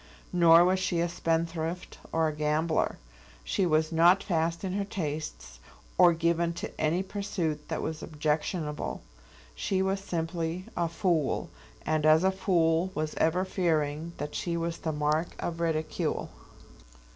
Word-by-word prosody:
Nor 170 -1 +7
was 185 +1 +2
she 180 -2 0
a 170 - +2
spendthrift, 165 0 -2
or 160 0 +2
a 155 - -3
gambler. 155 +2 0 0.5
She 190 -3 0
was 155 0 +2
not 175 +4 +5
fast 165 -1 -1
in 185 -1 -2
her 200 +1 0
tastes, 155 - -5 0.4
or 175 - +7
given 170 +1 +1
to 175 +6 -6
any 160 +4 +1
pursuit 185 -7 -3
that - - -3
was 160 -1 -4
objectionable. 150 - -2 0.5
She 190 -1 0
was 195 +1 0
simply 170 -1 -3
a 170 -1 0
fool, 165 -4 0 0.3
and 155 -1 +1
as 155 +2 +6
a 190 - +4
fool 175 -2 +2
was 155 0 -2
ever 180 +4 +2
fearing 160 -3 -1
that 150 - -5
she 170 -1 -2
was 170 0 -3
the 160 - -2
mark 150 +2 0
of 170 -1 -4
ridicule. 160 -2 -1
165 Hz, 145 wpm, -29 LUFS, 155-180 Hz, 0.5 s, Nor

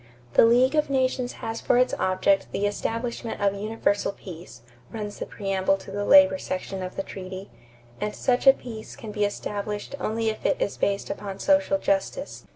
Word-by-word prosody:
"The - - +7
league 250 +4 +4
of 300 -2 +2
nations 255 -2 0
has 225 0 -3
for - - +3
its 250 0 +3
object 185 +1 +2
the 205 - -1
establishment 230 +3 -3
of 200 -1 +2
universal 205 0 0
peace," 175 -9 -11 0.3
runs 210 -2 -6
the - - -4
preamble 195 -1 0
to 195 - -11
the 205 +1 -2
labor 285 +4 +7
section 190 -2 -4
of 185 0 -5
the 195 - -2
treaty, 190 0 -8 0.5
"and 210 +6 -3
such 255 +1 +1
a 270 - +11
peace 225 -5 -9
can 220 - -8
be 210 -1 +1
established 205 +1 -4
only 225 +1 0
if 215 - -5
it - - +1
is 200 - -1
based 200 0 -1
upon 195 -2 -6
social 290 +5 +3
justice.... 295 +12 -2
210 Hz, 180 wpm, -25 LUFS, 195-245 Hz, 0.5 s, a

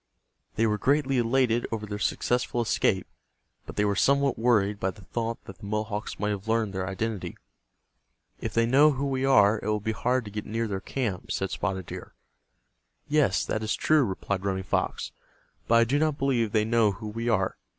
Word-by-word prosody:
They 115 - +2
were 105 -1 +1
greatly 135 +1 +2
elated 120 0 +2
over 110 -2 -3
their 105 0 -5
successful 120 +2 0
escape, 115 - +1 0.6
but - - -8
they 105 - +2
were 100 -1 +1
somewhat 140 +6 +3
worried 105 -4 +2
by 95 - 0
the 95 0 -11
thought 115 +2 -4
that 95 - -11
the - - -10
Mohawks 105 0 -3
might 105 0 0
have 100 +1 -5
learned 110 -3 +1
their 95 0 -3
identity. 105 +1 -3 1.0
"If - - -5
they 115 0 +4
know 145 +5 +5
who 135 +1 -2
we 135 -1 0
are, 105 -5 +5
it - - -6
will 105 0 +1
be 110 +2 -2
hard 125 +3 0
to 105 - -8
get 105 0 -5
near 115 +1 -1
their 95 -2 -3
camp," 110 -8 -3
said 95 - -2
Spotted 95 -3 -2
Deer. - - -9 0.9
"Yes, 150 -1 +2
that 110 - -2
is 110 0 -1
true," 155 -2 +3
replied 95 -2 -3
Running 95 -1 -1
Fox. - - -2 0.6
"But 115 - +4
I 115 - +7
do 135 +5 +1
not 155 -2 +1
believe 125 -6 +1
they 110 -1 +2
know 115 -2 +3
who 105 +3 -8
we 115 +3 -3
are. 95 -5 +1
110 Hz, 200 wpm, -27 LUFS, 105-125 Hz, 1.0 s, I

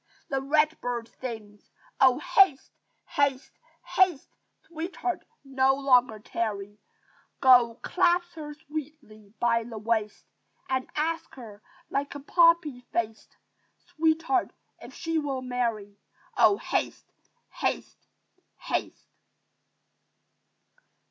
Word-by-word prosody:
The 270 -1 -1
red 305 +3 +2
bird 240 -2 -3
sings, 215 -5 -8 0.3
"Oh, 260 -2 +6
haste, 370 - +3 0.3
haste, 280 -1 0 0.3
haste! 365 -7 +2 0.3
Sweetheart! 340 +2 -4 0.2
no 270 -1 +2
longer 250 -5 +3
tarry! 205 -1 -4 0.6
Go, 245 -3 +6
clasp 350 -1 +2
her 295 -2 -8
sweetly 290 -9 -9
by 230 -1 +2
the 225 -1 -8
waist! 215 -1 -2 0.4
And 260 -1 -2
ask 325 +2 -2
her, 220 -5 -11 0.3
like 280 +1 -2
a - - -5
poppy 335 -3 +3
faced, 225 -1 -3 0.6
Sweetheart! 325 +4 +1 0.3
if - - -10
she 330 -1 -1
will 275 -3 -3
marry. 230 -5 -3 0.4
Oh, 400 - +5
haste, - - -3 0.4
haste, - - -3 0.5
haste!" - - -4
270 Hz, 100 wpm, -27 LUFS, 230-315 Hz, 0.6 s, Oh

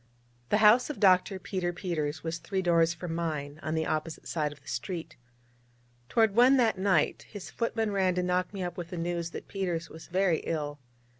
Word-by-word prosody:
The 210 - +4
house 235 +6 +6
of 300 - -5
Dr. 190 0 +4
Peter 185 -1 -2
Peters 160 -4 -3
was 165 0 -3
three 190 +4 -2
doors 170 -1 +4
from 170 0 -5
mine, 155 -3 -3
on 155 0 -2
the 160 0 0
opposite 155 +1 -3
side 150 -3 -1
of 150 - -13
the 140 - -24
street. 160 +6 -4 0.9
Toward 220 -3 +3
one 255 +3 +6
that 225 -6 +2
night, 190 -6 +1
his 205 -3 -8
footman 225 -2 -1
ran 190 -2 +1
to 180 - 0
knock 180 0 0
me 195 -2 -4
up 175 - -5
with 175 -2 -5
the 180 - -6
news 170 0 -2
that - - -8
Peters 175 -4 -3
was 160 - -11
very 180 -2 +2
ill. 150 -2 -3
175 Hz, 200 wpm, -29 LUFS, 160-195 Hz, 0.9 s, house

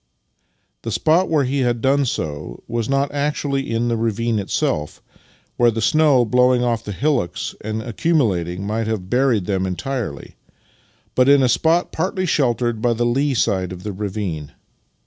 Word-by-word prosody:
The - - -5
spot 170 +4 +2
where 155 -3 +2
he 135 +2 -1
had 120 -2 +1
done 135 +3 +2
so 75 - -4
was 115 0 -2
not 135 +1 +1
actu 145 0 -2
ally 140 0 +1
in 120 -3 -1
the 120 - +1
ravine 115 0 0
itself, 75 -6 -2 0.6
where 120 -1 +5
the 115 0 -2
snow 145 0 +4
blowing 125 +1 +3
off 115 -2 0
the 105 - -6
hillocks 130 - -1
and 110 +1 -3
accumulating 100 - 0
might 110 +2 -2
have 100 -4 -3
buried 125 -6 +2
them 95 -1 -1
entirely, 95 - -5 0.8
but 130 +1 +3
in 140 -1 +6
a - - +4
spot 160 +9 +2
partly 185 0 -1
shelt 130 - +1
ered 120 -2 -1
by 120 0 +2
the 120 +1 -1
lee 135 +3 +1
side 95 -3 0
of 90 0 -8
the 105 - -4
ravine. 95 -6 -4
120 Hz, 170 wpm, -20 LUFS, 105-135 Hz, 0.8 s, in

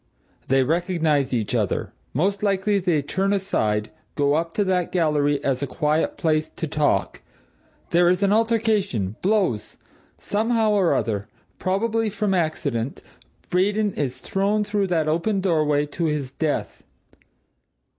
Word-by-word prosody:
They 135 0 +3
recognize 160 -3 +1
each 115 -5 -1
other - - -1 0.2
most 195 +8 0
likely 200 0 +1
they 175 -6 +1
turn 190 +7 0
aside, 110 - 0 0.2
go 145 -1 +2
up 165 +2 -1
to 205 - +2
that 185 -3 0
gallery 150 -4 +2
as 135 -1 0
a 140 - -1
quiet 150 +3 0
place, 155 -1 +1
to - - -5
talk 150 0 0 0.7
there 175 +1 +4
is 180 +3 +1
an 200 0 +3
altercation 215 - +1
blows 185 - 0 0.4
somehow 220 +1 +1
or 195 -5 +3
other, 105 -2 -1 0.3
probably 220 +4 0
from 205 -1 -1
accident, 140 -8 -1 0.5
Braden 205 +3 +1
is 130 -4 -2
thrown 200 +2 0
through 205 -1 0
that 165 -4 0
open 170 +6 +1
doorway, 155 -5 +2
to 165 +3 -3
his 150 -4 -2
death. 140 -8 -3
170 Hz, 135 wpm, -23 LUFS, 145-200 Hz, 0.7 s, there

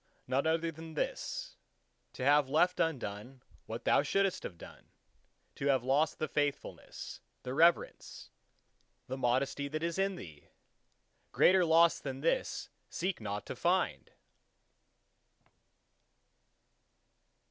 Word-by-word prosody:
None 130 +4 0
other 165 +1 +1
than 160 0 -10
this: - - -3 0.6
To 125 - -4
have 145 -1 +4
left 175 +5 +2
undone 125 -4 -3 0.2
what - - -6
thou - - +5
shouldst 195 -1 +1
have 85 - -7
done: - - -13 0.6
to 140 - -3
have 135 -3 +3
lost 140 +5 +2
the 155 - -2
faithfulness, 145 -2 -4 0.2
the 125 - -4
reverence, 165 +4 +1 0.7
the 130 - -4
modesty 130 +2 0
that 155 +3 -4
is 170 +2 -2
in 195 0 +1
thee! 75 - -11 0.8
Greater 185 0 +5
loss 165 0 +5
than 135 -1 -6
this 165 - -1 0.2
seek 180 -5 -3
not 105 -1 -4
to - - -6
find! - - 0
150 Hz, 115 wpm, -32 LUFS, 130-170 Hz, 0.8 s, thou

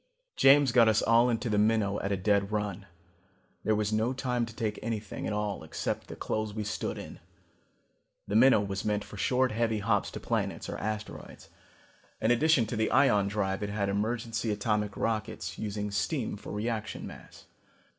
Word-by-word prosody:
"James 140 -1 +6
got 120 -2 +6
us 110 0 +3
all 115 +2 +5
into 120 +1 -1
the 105 -2 +1
Minnow 105 -2 +2
at 100 - -2
a 100 - +1
dead 100 +1 +1
run. 105 -2 -3 0.8
There 110 - +2
was 105 0 0
no 110 +4 +1
time 125 -2 -1
to 115 - -11
take 110 -3 -2
anything 110 -2 -4
at - - -2
all 105 -4 -2
except 80 - -4
the - - -8
clothes 110 -1 -3
we 110 - -2
stood 105 - -3
in. - - -9 1.1
The 100 - -2
Minnow 120 -1 +6
was 100 -1 -3
meant 105 -1 0
for 105 - -11
short 125 +4 +2
heavy 115 0 0
hops 105 -1 +1
to - - -7
planets - - -2
or - - -5
asteroids. 110 0 -6 0.7
In 110 - +2
addition 140 0 +4
to 115 - -4
the 110 0 +1
ion 105 -8 +4
drive 100 -1 -1
it 105 - -2
had 100 -1 -1
emergency 115 +2 -1
atomic 105 -1 -1
rockets, 110 -6 -2
using 105 -1 -3
steam 95 -2 -1
for - - -9
reaction 110 +1 -3
mass. - - -12
105 Hz, 180 wpm, -29 LUFS, 105-115 Hz, 1.1 s, James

